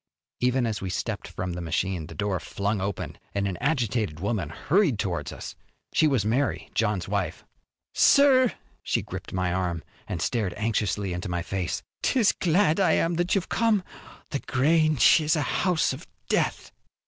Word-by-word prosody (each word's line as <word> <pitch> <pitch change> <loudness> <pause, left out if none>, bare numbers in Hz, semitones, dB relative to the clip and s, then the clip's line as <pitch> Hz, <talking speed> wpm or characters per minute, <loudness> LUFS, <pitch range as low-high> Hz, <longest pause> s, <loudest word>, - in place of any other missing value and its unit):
Even 125 0 +2
as 110 -2 -2
we 95 - -3
stepped - - -3
from 90 -1 -4
the 90 - -5
machine 85 0 -2
the - - -10
door 100 -3 -1
flung 100 0 -2
open 100 0 -4 0.2
and 100 0 +1
an 95 - -2
agitated 115 - 0
woman 100 -5 -1
hurried 150 - +1
towards 90 -4 -2
us. - - -8 0.4
She 155 - +4
was 130 -9 +1
Mary, 130 +6 0
John's 105 -5 0
wife. - - -2 0.5
"Sir!" 260 -3 +6 0.3
She - - -1
gripped - - -7
my 90 -1 0
arm 90 -3 -1 0.2
and 90 - -3
stared 105 0 -1
anxiously 105 -3 -1
into 90 +1 -4
my 90 -1 -2
face. 95 -1 -3 0.2
"'Tis 230 -7 +3
glad 175 0 +2
I 190 - +4
am 165 +1 +2
that 175 +3 +1
you've 190 -2 -1
come. 225 -4 +2 0.5
The 140 - -1
Grange 155 +3 +4
is 155 +2 +2
a 150 - 0
house 180 0 +1
of - - -9 0.2
death." - - 0
110 Hz, 170 wpm, -26 LUFS, -, 0.5 s, Sir